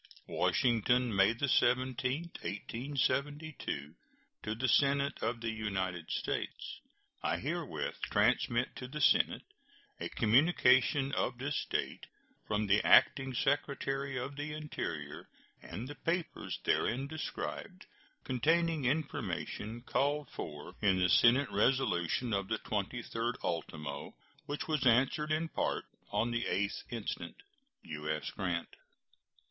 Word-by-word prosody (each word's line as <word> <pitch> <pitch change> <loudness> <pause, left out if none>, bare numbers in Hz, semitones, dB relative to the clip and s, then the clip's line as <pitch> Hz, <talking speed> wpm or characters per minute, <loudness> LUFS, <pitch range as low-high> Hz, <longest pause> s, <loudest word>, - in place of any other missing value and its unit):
WASHINGTON, 120 -1 +2
May 100 +4 +4
17, 130 +1 +2 0.2
1872. 135 - -2 0.5
To 110 - -3
the 130 +3 0
Senate 140 +2 +3
of 115 +1 -1
the 115 -1 -1
United 95 -6 -3
States: - - -3 0.4
I - - 0
herewith - - -3
transmit 120 +2 +2
to 125 - -6
the 150 +4 -6
Senate 150 - +4 0.6
a - - -3
communication 130 +2 +4
of 125 -3 -1
this 145 +4 -2
date - - -2 0.4
from 105 0 0
the 100 +1 +3
Acting 135 -1 +5
Secretary 135 0 0
of 130 +3 -4
the 150 +1 -4
Interior, 150 -1 -5 0.3
and 105 +9 -6
the 145 - -6
papers 165 +3 -2
therein 130 +4 +1
described, 155 +2 -5 0.4
containing 160 +4 +1
information 125 -5 -2
called 145 +2 0
for 75 -1 -7
in 95 -3 +4
the 90 -1 +3
Senate 120 - +5
resolution 110 -1 +1
of 100 -1 0
the 110 - 0
23d 115 +3 -2
ultimo, 75 -4 -4 0.3
which 145 +1 -3
was 150 -4 +1
answered 135 +6 +3
in 155 +2 +1
part - - -1 0.2
on 120 +2 0
the 120 0 -1
8th 100 +2 -1
[7th] - - -21
instant. 115 -3 -4 0.5
U.S. 75 -1 -3
GRANT. 85 -4 -3
125 Hz, 120 wpm, -33 LUFS, 105-140 Hz, 0.6 s, Acting